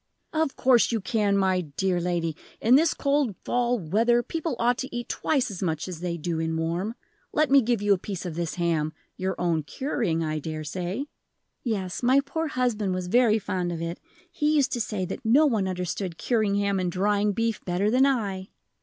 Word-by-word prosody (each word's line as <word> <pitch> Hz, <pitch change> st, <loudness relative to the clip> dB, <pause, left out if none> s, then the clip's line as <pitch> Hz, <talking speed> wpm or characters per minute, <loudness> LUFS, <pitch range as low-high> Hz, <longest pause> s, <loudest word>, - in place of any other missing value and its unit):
"Of 315 Hz, -3 st, 0 dB
course 250 Hz, -3 st, +4 dB
you 230 Hz, -, +1 dB
can, 200 Hz, 0 st, +1 dB
my 190 Hz, -2 st, +2 dB
dear 175 Hz, +3 st, -1 dB
lady; 170 Hz, -2 st, -1 dB, 0.2 s
in 230 Hz, -, +3 dB
this 315 Hz, +4 st, +5 dB
cold 280 Hz, -7 st, +1 dB
fall 245 Hz, 0 st, +1 dB
weather 225 Hz, +7 st, +2 dB
people 320 Hz, +1 st, -3 dB
ought 240 Hz, +1 st, +2 dB
to 265 Hz, -, -3 dB
eat 240 Hz, 0 st, -4 dB
twice 270 Hz, -7 st, 0 dB
as 185 Hz, -, -7 dB
much 160 Hz, -4 st, -1 dB
as 180 Hz, -3 st, -6 dB
they 175 Hz, -1 st, -3 dB
do 165 Hz, 0 st, -2 dB
in 160 Hz, 0 st, -1 dB
warm. 170 Hz, +7 st, -2 dB, 0.4 s
Let 305 Hz, -3 st, +2 dB
me 275 Hz, 0 st, +7 dB
give 235 Hz, -3 st, 0 dB
you 205 Hz, -1 st, +5 dB
a 190 Hz, -, 0 dB
piece 190 Hz, -1 st, -5 dB
of 175 Hz, -, -4 dB
this 170 Hz, 0 st, -3 dB
ham, 165 Hz, -3 st, 0 dB, 0.2 s
your 190 Hz, +1 st, -2 dB
own 170 Hz, -3 st, +1 dB
curing, 170 Hz, -, -2 dB
I 155 Hz, -1 st, -2 dB
dare 155 Hz, +1 st, -5 dB
say." 180 Hz, -, -3 dB, 0.6 s
"Yes: 195 Hz, -7 st, -2 dB
my 255 Hz, +3 st, +5 dB
poor 300 Hz, +4 st, -2 dB
husband 225 Hz, -8 st, 0 dB
was 180 Hz, -1 st, -4 dB
very 235 Hz, 0 st, +4 dB
fond 180 Hz, -4 st, -2 dB
of 170 Hz, -, -4 dB
it. 170 Hz, +1 st, -4 dB, 0.3 s
He 300 Hz, -1 st, +1 dB
used 280 Hz, -3 st, +3 dB
to 240 Hz, -, -1 dB
say 210 Hz, -4 st, -2 dB
that 190 Hz, +8 st, -6 dB
no 255 Hz, +8 st, +5 dB
one 220 Hz, -9 st, +1 dB
understood 180 Hz, -1 st, -3 dB
curing 215 Hz, -5 st, +1 dB
ham 200 Hz, -1 st, +1 dB
and 180 Hz, -1 st, -1 dB
drying 205 Hz, +3 st, +1 dB
beef 230 Hz, +1 st, -1 dB
better 190 Hz, +4 st, 0 dB
than 260 Hz, +3 st, +5 dB
I." 200 Hz, -8 st, -1 dB
200 Hz, 205 wpm, -26 LUFS, 175-245 Hz, 0.6 s, me